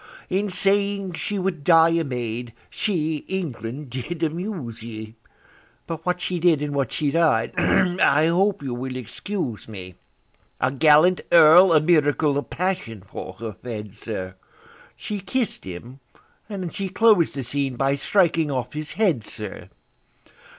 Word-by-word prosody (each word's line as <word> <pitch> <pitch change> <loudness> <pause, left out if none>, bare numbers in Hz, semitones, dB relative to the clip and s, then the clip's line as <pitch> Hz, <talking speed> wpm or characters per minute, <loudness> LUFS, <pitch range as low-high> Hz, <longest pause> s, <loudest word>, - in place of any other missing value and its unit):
In 200 +3 0
saying 200 0 +1
she 205 +4 -3
would 185 -5 -2
die 165 0 +6
a 165 0 +1
maid, 120 -3 -4 0.2
she, 160 -7 -1
England! 140 - -5
did 155 +7 -5
amuse 160 - -4
ye. 110 -1 -8 0.7
But 165 -1 -6
what 180 0 +1
she 180 -1 -2
did, 165 -3 +4
and 145 -1 -3
what 135 -4 -1
she 145 -2 -1
died—I 160 +2 +3
hope 190 +2 +1
you 130 -3 -3
will 130 +1 -5
excuse 130 - -5
me: 95 -4 -9 0.7
A 130 - +1
gallant 155 +5 +5
Earl 170 +3 +8
a 160 - +6
miracle 150 -2 +2
of - - -8
passion 175 - -3
for 95 -1 -8
her 110 +2 -7
fed, 105 -1 -7
sir; 95 -5 -6 0.6
She 210 -1 -5
kiss'd 235 - -2
him, 115 +9 -9 0.5
and 185 -5 -5
she 195 -1 -3
clos'd 210 -8 +3
the 135 - -3
scene 135 +1 -2
by 135 +2 +1
striking 165 +1 +2
off 130 -1 -3
his 150 0 -5
head, 180 - +1
sir! 105 -2 -7
155 Hz, 145 wpm, -23 LUFS, 120-180 Hz, 0.7 s, Earl